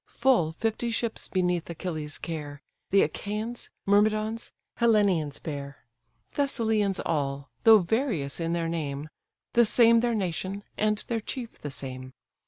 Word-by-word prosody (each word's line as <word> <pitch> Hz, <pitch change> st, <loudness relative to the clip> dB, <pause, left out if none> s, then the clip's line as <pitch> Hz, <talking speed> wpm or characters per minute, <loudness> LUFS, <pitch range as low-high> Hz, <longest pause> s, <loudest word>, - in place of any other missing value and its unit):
Full 235 Hz, -11 st, +3 dB
fifty 225 Hz, +6 st, -2 dB
ships 230 Hz, 0 st, -2 dB
beneath 180 Hz, -3 st, 0 dB
Achilles' 155 Hz, -3 st, -4 dB
care, 150 Hz, -3 st, -6 dB, 0.3 s
The 195 Hz, -, +5 dB
Achaians, 215 Hz, +4 st, -4 dB, 0.2 s
Myrmidons, 215 Hz, +2 st, +2 dB, 0.3 s
Hellenians 200 Hz, -, +3 dB
bear; 140 Hz, -3 st, -7 dB, 0.5 s
Thessalians 220 Hz, -8 st, +1 dB
all, 140 Hz, -2 st, -2 dB
though 225 Hz, -1 st, +10 dB
various 185 Hz, -, -1 dB
in 165 Hz, 0 st, -1 dB
their 170 Hz, -1 st, 0 dB
name; 150 Hz, -3 st, -3 dB, 0.4 s
The 235 Hz, -, +6 dB
same 230 Hz, +1 st, +6 dB
their 235 Hz, 0 st, +1 dB
nation, 190 Hz, +1 st, -2 dB
and 215 Hz, 0 st, +1 dB
their 230 Hz, -2 st, -1 dB
chief 235 Hz, +1 st, -6 dB
the 145 Hz, -, -5 dB
same. 130 Hz, -1 st, -7 dB
195 Hz, 130 wpm, -27 LUFS, 155-225 Hz, 0.5 s, though